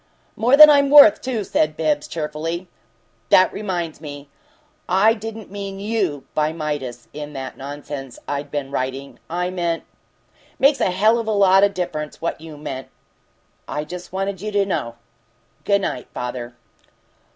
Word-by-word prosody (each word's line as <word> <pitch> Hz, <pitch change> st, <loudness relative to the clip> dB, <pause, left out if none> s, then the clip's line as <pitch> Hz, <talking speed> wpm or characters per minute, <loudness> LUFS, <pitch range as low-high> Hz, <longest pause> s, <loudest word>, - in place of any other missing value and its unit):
"More 245 Hz, +5 st, +3 dB
than 305 Hz, 0 st, +12 dB
I'm 280 Hz, -2 st, +5 dB
worth, 285 Hz, -7 st, +8 dB
too," 245 Hz, -5 st, -2 dB
said 155 Hz, -4 st, 0 dB
Bibbs, 150 Hz, -2 st, 0 dB
cheerily. 165 Hz, +3 st, -4 dB, 0.6 s
"That 185 Hz, -, +5 dB
reminds 175 Hz, -7 st, -4 dB
me, 145 Hz, -2 st, -9 dB, 0.6 s
I 195 Hz, +5 st, +5 dB
didn't 225 Hz, -2 st, -8 dB
mean 195 Hz, -1 st, -6 dB
YOU 200 Hz, -9 st, -1 dB
by 155 Hz, 0 st, +1 dB
'Midas' 145 Hz, -7 st, -5 dB
in 150 Hz, 0 st, -7 dB
that 135 Hz, -1 st, -6 dB
nonsense 140 Hz, -2 st, -7 dB
I'd 145 Hz, 0 st, -3 dB
been 140 Hz, -2 st, -4 dB
writing. 135 Hz, +1 st, -4 dB
I 180 Hz, +2 st, -2 dB
meant 170 Hz, -2 st, -2 dB, 0.4 s
" -, -, -32 dB
"Makes 275 Hz, +2 st, +3 dB
a -, -, +3 dB
hell 215 Hz, +6 st, +3 dB
of 230 Hz, -, -4 dB
a -, -, +1 dB
lot 195 Hz, -2 st, +5 dB
o' -, -, +7 dB
difference 175 Hz, -6 st, -4 dB
what 165 Hz, -1 st, -3 dB
you 160 Hz, -2 st, -10 dB
meant!" 140 Hz, -3 st, -6 dB, 0.8 s
"I 150 Hz, -, -3 dB
just 180 Hz, +3 st, -9 dB
wanted 190 Hz, 0 st, -3 dB
you 215 Hz, +1 st, -4 dB
to 200 Hz, -1 st, +2 dB
know. 115 Hz, -11 st, -3 dB, 0.7 s
Good 200 Hz, -1 st, +3 dB
night, 125 Hz, -9 st, -3 dB
father." 120 Hz, -1 st, -5 dB
170 Hz, 160 wpm, -21 LUFS, 145-200 Hz, 0.8 s, than